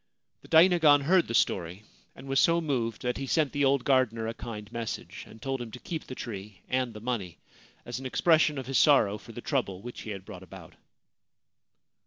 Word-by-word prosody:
The - - -16
dainagon 160 -3 +6
heard 175 +5 +3
the 115 - -2
story, 90 +1 0 0.3
and - - -12
was 135 0 +2
so 170 0 +4
moved 125 -9 -2
that 125 0 -1
he 135 - -4
sent 150 0 +1
the 145 -1 0
old 135 -1 +2
gardener 130 -5 +2
a 115 - -3
kind 105 -2 -8
message, 115 -1 -6
and 110 - -14
told 135 +1 -3
him 120 - -6
to 125 - -10
keep 160 +2 -6
the 130 - -8
tree 105 -5 -7
and 130 -1 0
the - - -7
money, 105 -7 -4 0.5
as 120 +1 -5
an 135 - -5
expression 155 +1 +3
of 130 - -4
his 135 +1 +1
sorrow 105 -9 +4
for - - -13
the - - -8
trouble 95 0 -2
which 120 0 -8
he - - -8
had 100 -2 -6
brought 100 -4 -10
about. 95 -3 -12
125 Hz, 210 wpm, -28 LUFS, 105-140 Hz, 0.5 s, dainagon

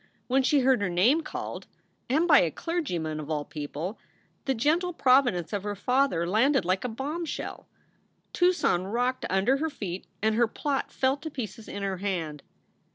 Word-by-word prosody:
When 265 +2 +2
she 275 +2 +3
heard 260 -3 +3
her 200 - 0
name 220 - +3
called, - - -6 0.4
and 310 +7 +3
by 295 -4 +8
a 170 - +2
clergyman, 175 - -3
of 150 0 -7
all 150 -2 -1
people, 150 +6 -5 0.5
the 270 -1 +1
gentle 330 +9 +1
providence 250 - +3
of 205 - -1
her 205 +1 -3
father 250 -5 +1
landed 235 +8 +3
like 185 +1 +1
a - - -1
bombshell. 295 +8 -5 0.7
Tucson 350 - +2
rocked 245 +5 -1
under 195 +8 +2
her 320 +3 -1
feet 195 - -6
and 220 +1 +2
her 235 +1 +3
plot 275 +4 -2
fell 265 +1 +1
to 315 +3 -6
pieces 230 -5 -6
in 200 - -5
her 195 -1 -1
hand. 170 -7 -3
235 Hz, 170 wpm, -27 LUFS, 185-280 Hz, 0.7 s, by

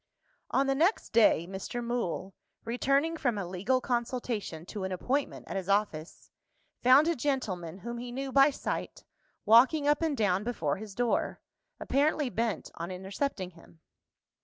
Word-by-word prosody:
On 275 - +2
the 270 - +2
next 335 +10 +1
day, 210 -7 +5
Mr. 195 +6 -5
Mool 230 -5 -3 0.3
returning 275 +7 +1
from 245 -8 0
a 200 - -2
legal 190 +9 0
consultation 235 -9 -3
to 200 +1 -6
an 190 - -3
appointment 265 +10 -2
at - - -5
his 190 0 -3
office 195 -6 -1 0.5
found 260 +5 +6
a 340 - +2
gentleman, 210 - -2
whom 235 +4 -6
he 245 0 -6
knew 270 +2 -4
by 275 +2 +6
sight, 280 - -4 0.4
walking 265 +7 +5
up 295 +1 +3
and 315 -4 0
down 195 -2 +1
before 165 -12 -1
his 205 -1 -9
door; 240 -1 0 0.4
apparently 290 -1 +1
bent 225 -6 -2
on 170 +2 -6
intercepting 190 +2 -3
him. 165 -1 -19
235 Hz, 155 wpm, -30 LUFS, 190-270 Hz, 0.5 s, found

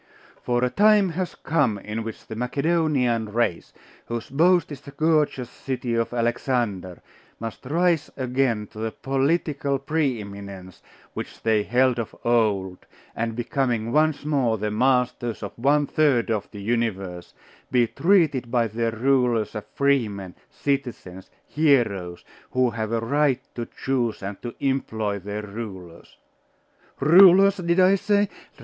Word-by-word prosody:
For 120 0 0
a 125 - +1
time 210 0 +4
has 180 +2 -4
come 125 -10 0
in 105 +3 -5
which 110 -1 -8
the 110 - -7
Macedonian 125 -3 0
race, 115 -6 -1 0.4
whose 115 -1 -5
boast 170 +3 +3
is 140 -2 -8
the 140 - -12
gorgeous 150 -3 +1
city 130 -3 -4
of 115 0 0
Alexander, 115 -6 -2 0.4
must 115 +2 -7
rise 165 +1 +1
again 125 -4 0
to 110 - -11
the 110 0 -1
political 140 +2 -1
pre 140 -3 -1
eminence 100 -3 -9 0.3
which - - -8
they 110 -2 +3
held 125 +3 +2
of 115 - -5
old, 105 -6 +1 0.4
and 115 0 -2
becoming 120 -2 -1
once 155 0 +2
more 135 -7 +1
the 105 +1 -2
masters 125 0 0
of - - -5
one 145 +4 +2
third 140 -7 +2
of 105 -2 -2
the 100 -2 -9
universe, 100 -6 -2 0.4
be 125 -2 +4
treated 155 - +2
by 120 -1 +1
their 115 +2 -1
rulers 120 -2 +1
as 105 - -6
freemen, 110 -10 0 0.2
citizens, 120 -10 -4 0.2
heroes, 110 - +1 0.2
who 125 -1 +1
have 110 -1 -4
a 115 -1 0
right 140 +2 +1
to 120 -1 -5
choose 120 -6 -2
and 100 0 -6
to 120 - -6
employ 110 -7 -1
their 105 +2 -5
rulers 95 - -9 0.8
Rulers, 190 +5 +7
did 170 0 0
I 185 +1 +6
say? 205 +1 +2
120 Hz, 140 wpm, -24 LUFS, 110-140 Hz, 0.8 s, Rulers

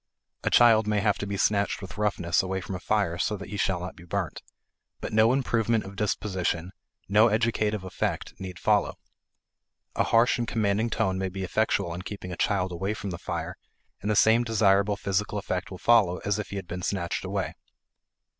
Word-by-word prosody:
A - - +1
child 110 -3 +6
may 105 -1 +2
have 105 -1 +1
to 100 - -3
be 100 0 -3
snatched 100 +1 +1
with 95 +1 -9
roughness 90 -5 +1
away 95 0 -2
from 95 +1 -6
a 90 - -4
fire 85 -3 0
so 105 +4 0
that 100 - -9
he 105 - -5
shall 95 -2 0
not 90 +1 -6
be 85 - -14
burnt. 85 - -3 0.6
But - - -5
no 110 +2 +5
improvement 115 -4 +1
of 95 +1 -10
disposition, 95 -4 -1 0.4
no 105 +3 +5
educative 110 -2 0
effect, 95 - -3
need 95 -2 -7
follow. - - +1 1.0
A - - +2
harsh 120 +2 +3
and 120 - -1
commanding 110 0 +1
tone 95 -4 0
may 95 0 -1
be 95 +1 -5
effectual 100 -2 0
in 90 - -5
keeping 95 -1 -7
a - - -4
child 95 0 0
away 95 +5 -2
from 100 -2 -5
the 85 - -6
fire, - - -4 0.4
and 105 - -3
the 105 - +2
same 110 +3 +5
desirable 100 -3 +3
physical 105 +1 -1
effect 95 -2 -3
will 95 - -8
follow 100 -5 +4
as 105 +1 0
if 105 - -5
he - - -6
had 95 -3 -5
been 90 +1 -5
snatched 85 -1 -2
away. - - -2
100 Hz, 200 wpm, -27 LUFS, 95-110 Hz, 1.0 s, child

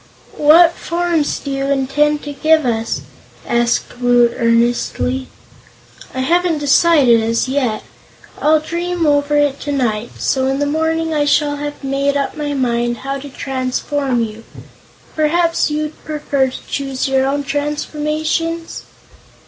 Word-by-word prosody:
"What 330 +3 +6
forms 340 -4 -1
do 280 - -6
you 275 0 -2
intend 285 +2 +1
to 290 - -6
give 310 +1 +3
us?" 225 -2 -1 0.5
asked 240 +1 0
Woot 245 -1 +3
earnestly. 240 +2 0 0.9
"I 260 - -1
haven't 345 +4 +1
decided, 285 -4 +4
as 230 +2 0
yet. 260 -5 -1 0.6
I'll 310 +1 +4
dream 340 +2 -2
over 290 0 +2
it 290 -1 +1
tonight, 240 -6 -1
so 265 -1 0
in 270 0 0
the 290 - 0
morning 320 +2 0
I 295 -1 +1
shall 290 0 +2
have 290 0 -6
made 275 +1 0
up 280 - -2
my 295 -2 -3
mind 240 -2 0
how 275 0 -2
to 285 +1 -9
transform 265 -1 -2
you. 220 0 -7 0.7
Perhaps 330 +2 +1
you'd 305 0 -4
prefer 290 -3 -1
to 255 - -9
choose 270 -2 -2
your 265 0 +2
own 285 +1 -1
transformations?" 305 +3 -2
285 Hz, 135 wpm, -17 LUFS, 260-305 Hz, 0.9 s, What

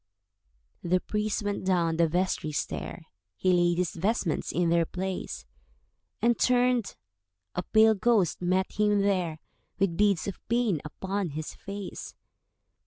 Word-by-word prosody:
The 180 +1 +2
priest 210 +2 -2
went 205 -1 -2
down 170 -3 +1
the 170 -1 +4
vestry 175 -2 -1
stair, 145 - -4 0.3
He 185 -1 +2
laid 175 -1 +3
his 180 -2 0
vestments 185 -2 -1
in 175 0 +1
their 170 0 +4
place, 190 0 -4 0.8
And 235 0 +3
turned—a 95 - -1
pale 220 +4 +5
ghost 210 -5 +2
met 185 +2 +1
him 210 -1 +2
there, 180 -5 0 0.4
With 195 -4 0
beads 205 -4 +2
of 195 - -5
pain 230 -9 +1
upon 190 +4 -3
his 155 +1 -5
face. 200 -1 -7
185 Hz, 130 wpm, -28 LUFS, 170-205 Hz, 0.8 s, pale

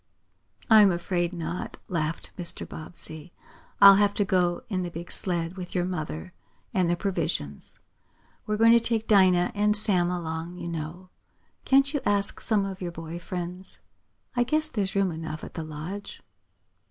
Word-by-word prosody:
"I'm 215 -3 +7
afraid 175 0 -2
not," 170 0 -6
laughed 165 -2 -3
Mr. 175 -2 -3
Bobbsey. 160 0 -8 0.5
"I'll 195 -1 +9
have 205 0 +2
to 205 - 0
go 180 -2 0
in 190 -4 -2
the 175 - -4
big 170 +1 -9
sled 175 -1 +7
with 180 0 -8
your 175 -1 0
mother, 175 0 -5 0.4
and 180 -3 +1
the 175 - +2
provisions. 165 - -4 0.7
We're 210 0 -1
going 225 +1 +5
to 235 - +6
take 225 -1 -1
Dinah 185 -4 +4
and 210 0 +3
Sam 185 -5 +5
along, 170 0 -5
you 170 - -7
know. 170 +3 -7 0.5
Can't 275 +2 +3
you 290 - -1
ask 200 -1 -1
some 210 -3 +1
of 195 -1 -7
your 175 -1 -4
boy 165 0 -8
friends? 180 +1 -6 0.6
I 245 - +2
guess 310 +5 0
there's 200 -7 -3
room 195 -2 +1
enough 160 -1 -7
at - - -9
the 165 - -5
Lodge." 155 +6 -8
180 Hz, 165 wpm, -26 LUFS, 170-200 Hz, 0.7 s, I'll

